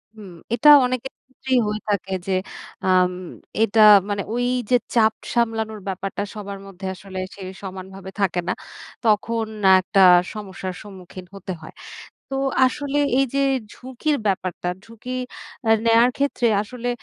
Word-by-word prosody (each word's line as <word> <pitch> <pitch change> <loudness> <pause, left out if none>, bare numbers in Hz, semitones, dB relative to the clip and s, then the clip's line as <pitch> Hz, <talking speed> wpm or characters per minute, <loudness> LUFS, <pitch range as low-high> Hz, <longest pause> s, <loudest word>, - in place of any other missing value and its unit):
হুম। 205 -4 -11 0.2
এটা 295 +5 +5 0.2
অনেকের 255 +1 -3
ক্ষেত্রেই 260 -1 -1
হয়ে 210 0 -3
থাকে 195 -2 -1
যে - - -1 0.5
আম 185 -1 +4 0.5
এটা 225 0 +2 0.3
মানে 205 0 -1
ওইযে 245 -1 0 0.2
চাপ 220 -1 +4 0.2
সামলানোর 225 -2 0
ব্যাপারটা 195 +1 -3
সবার 200 -1 -7
মধ্যে 190 0 -10
আসলে 190 +1 -8 0.2
সে 200 - -12 0.2
সমানভাবে 190 0 -8
থাকে 180 -2 +1
না। 180 - +1 0.5
তখন 225 +1 +1 0.3
একটা 190 +1 +1 0.3
সমস্যার 190 -3 -6
সম্মুখীন 185 -2 -11
হতে 190 -1 -6
হয়। 155 - -11 0.6
তো 270 - -3 0.3
আসলে 285 +2 -1 0.2
এইযে 275 0 +1 0.3
ঝুঁকির 260 +4 -2
ব্যাপারটা, 185 -3 -2 0.2
ঝুঁকি 230 +2 -11 0.6
আ - - +4 0.2
নেয়ার 230 +2 +5
ক্ষেত্রে 275 -3 0 0.2
আসলে 245 +3 -6
210 Hz, 130 wpm, -22 LUFS, 190-245 Hz, 0.6 s, এটা